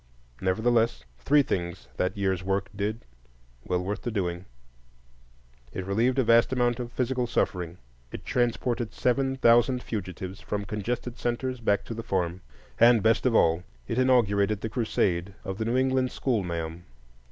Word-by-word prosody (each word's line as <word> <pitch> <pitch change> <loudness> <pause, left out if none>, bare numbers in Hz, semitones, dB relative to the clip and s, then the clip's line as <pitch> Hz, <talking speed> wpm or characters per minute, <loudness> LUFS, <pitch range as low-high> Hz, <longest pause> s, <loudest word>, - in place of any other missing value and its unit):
Nevertheless, 115 +5 +1
three 145 - +4
things 85 - -3
that 95 +2 -1
year's 95 -2 0
work 95 +1 -1
did, 105 +3 -3 0.6
well 90 0 -1
worth 100 +3 -3
the - - -3
doing: 90 -5 -2 1.3
it 95 - -4
relieved 115 +7 +1
a 130 - +4
vast 115 +1 +4
amount 120 -2 +1
of 120 -1 -5
physical 125 0 -1
suffering; 90 -6 -1 0.3
it - - -8
transported 120 -1 0
seven 135 +1 +1
thousand 125 0 +4
fugitives 95 -2 -5
from 105 -1 -3
congested 120 +4 -4
centres 125 +1 -2
back 100 -3 +1
to - - -5
the 115 - -5
farm; 95 -5 -2 0.4
and, 115 -2 +6
best 115 +3 +3
of 120 - +1
all, 85 -2 +4 0.3
it 115 +1 -1
inaugurated 110 -5 +3
the 110 - -3
crusade 100 -5 0
of 95 +2 -5
the 110 - -1
New 120 +3 +1
England 130 0 +2
schoolma'am. 85 -10 -2
110 Hz, 150 wpm, -27 LUFS, 95-120 Hz, 1.3 s, and